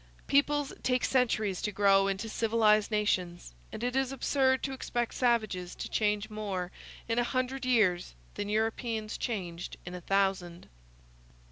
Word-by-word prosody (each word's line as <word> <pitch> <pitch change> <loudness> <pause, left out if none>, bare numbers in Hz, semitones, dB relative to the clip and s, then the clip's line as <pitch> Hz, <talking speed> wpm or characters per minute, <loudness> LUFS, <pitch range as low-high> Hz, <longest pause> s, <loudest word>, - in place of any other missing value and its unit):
Peoples 285 0 +2
take 250 -1 +1
centuries 220 -7 +1
to 210 - -1
grow 195 -1 +4
into 195 +3 -2
civilized 215 -1 +3
nations; 185 - -1 0.2
and - - -6
it 250 +1 -1
is 265 -1 +1
absurd 265 -1 +1
to 270 - -2
expect 240 -2 -2
savages 215 -8 0
to - - -5
change 210 -1 0
more 200 -4 -4 0.4
in 230 +1 +1
a - - +3
hundred 255 +1 -2
years 185 - +2 0.2
than 205 - -4
Europeans 220 0 -1
changed 180 -7 -4
in 175 - -7
a 180 - -6
thousand. 190 -2 0
215 Hz, 145 wpm, -30 LUFS, 195-245 Hz, 0.4 s, grow